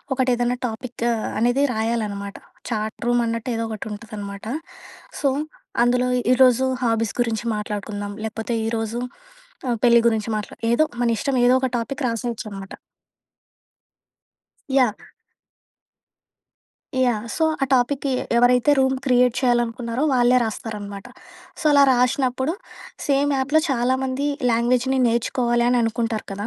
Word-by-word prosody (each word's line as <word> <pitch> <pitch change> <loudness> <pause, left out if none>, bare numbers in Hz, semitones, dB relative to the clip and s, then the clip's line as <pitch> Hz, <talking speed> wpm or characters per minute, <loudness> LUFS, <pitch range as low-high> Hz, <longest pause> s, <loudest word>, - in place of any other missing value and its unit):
ఒకటేదన్నా 245 -1 +1
topic 235 +1 -5 0.3
అనేది 245 +5 +3
రాయాలనమాట. 215 -3 -2 0.4
Chat 215 -1 -2
రూమన్నట్టు 235 0 0
ఏదోకటుంటదనమాట. 215 -2 -6 0.8
So, 280 - +2 0.5
అందులో 250 +1 +2 0.3
ఈరోజు 255 0 +4 0.2
హాబీస్ 225 -3 0
గురించి 230 -1 -1
మాట్లాడుకుందాం, 205 -1 -5
లేకపోతే 225 +1 -4
ఈరోజు 225 +1 -2 0.7
ఆహ్, 240 - +1
పెళ్ళి 235 -1 +6
గురించి 220 -1 +1
మాట్లా 210 - -5 0.2
ఏదో 275 +6 +4 0.2
మన 240 - +2
ఇష్టం, 270 +4 -1
ఏదో 250 - +5
ఒక 260 - 0
టాపిక్ 270 +5 -4
రాసేయచ్చనమాట. 220 -4 -5 2.0
యాహ్! 255 -6 +2 2.0
యాహ్! 235 -4 +1
సో, 320 - +2 0.2
ఆ - - +6
టాపిక్‌కి 270 +2 +1 0.3
ఎవరైతే 245 +3 +4
రూమ్ 265 0 +2
క్రియేట్ 250 -2 +3
చెయ్యాలనుకున్నారో 240 0 0
వాళ్ళే 245 0 +4
రాస్తారనమాట. 205 -2 -6 0.5
సో, - - -7
అలా 285 - +6
రాసినప్పుడు, 255 +4 +1 0.5
సేమ్ 285 0 +2
యాప్‍లో 285 +4 +2
చాలా 255 0 +1
మంది 265 +2 -1 0.2
లాంగ్వేజ్‌ని 250 +3 +1
నేర్చుకోవాలి 240 +1 +1
అని 250 - +3
అనుకుంటారు 225 -1 -2
కదా! 200 +2 -4
240 Hz, 110 wpm, -22 LUFS, 220-255 Hz, 2.0 s, పెళ్ళి